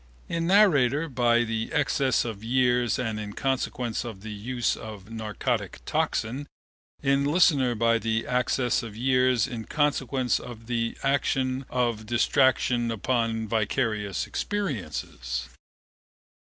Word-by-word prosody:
In 165 0 -1
narrator 165 - +4
by 120 -3 +2
the 115 -1 -3
access 140 -5 +1
of 110 -3 -6
years 125 -1 +2
and 115 -4 -2
in 105 -1 -6
consequence 125 -3 -2
of 110 -5 -7
the 110 +1 -7
use 120 +4 -1
of 110 -2 -9
narcotic 110 -2 -2
toxin: 125 +6 -1 0.6
in 140 0 +3
listener 145 -5 +3
by 115 +1 +3
the 115 +1 -1
access 125 -1 +1
of 110 -3 -8
years 125 -2 +3
and 120 - -6
in 110 - -6
consequence 135 -4 +1
of 115 -2 -10
the 115 -1 -2
action 135 -1 0
of 120 -4 -1
distraction 120 0 +2
upon 115 0 -1
vicarious 105 -2 -1
experiences. 205 -1 -3
120 Hz, 125 wpm, -26 LUFS, 115-130 Hz, 0.6 s, narrator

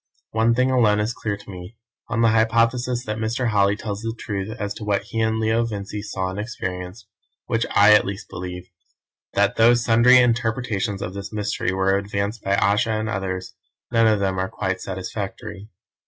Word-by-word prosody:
One 115 +1 +2
thing 130 +2 +2
alone 110 -5 +3
is 105 +3 -1
clear 105 -3 -3
to 100 - -15
me 90 +4 -10 0.3
on 115 0 -1
the 115 - +5
hypothesis 115 +3 +2
that 110 -1 -3
Mr. 115 +2 -1
Holly 100 -1 +3
tells 105 -1 -5
the 115 0 -4
truth 100 -1 -4
as 105 -1 -2
to 105 - -9
what 105 -1 0
he 115 - -3
and 110 0 +1
Leo 110 +1 +2
Vincey 105 -2 -5
saw 95 -3 -3
and 95 - -6
experienced, 90 -3 -5 0.4
which 115 0 0
I 105 +1 +6
at 105 - +6
least 100 +1 -6
believe 90 0 -7 0.7
that - - +2
though 115 +2 +6
sundry 120 +2 +5
interpretations 115 -4 0
of 90 - -5
this 100 -1 -7
mystery 105 -2 -2
were 95 +1 +2
advanced 100 +2 -3
by 100 0 +1
Ayesha 105 +3 +2
and 110 +1 -2
others, 95 -2 -4 0.4
none 115 -1 +4
of 110 -2 +3
them 95 -1 0
are 95 0 -1
quite 95 -2 -3
satisfactory. 95 +2 -6
105 Hz, 185 wpm, -22 LUFS, 100-115 Hz, 0.7 s, I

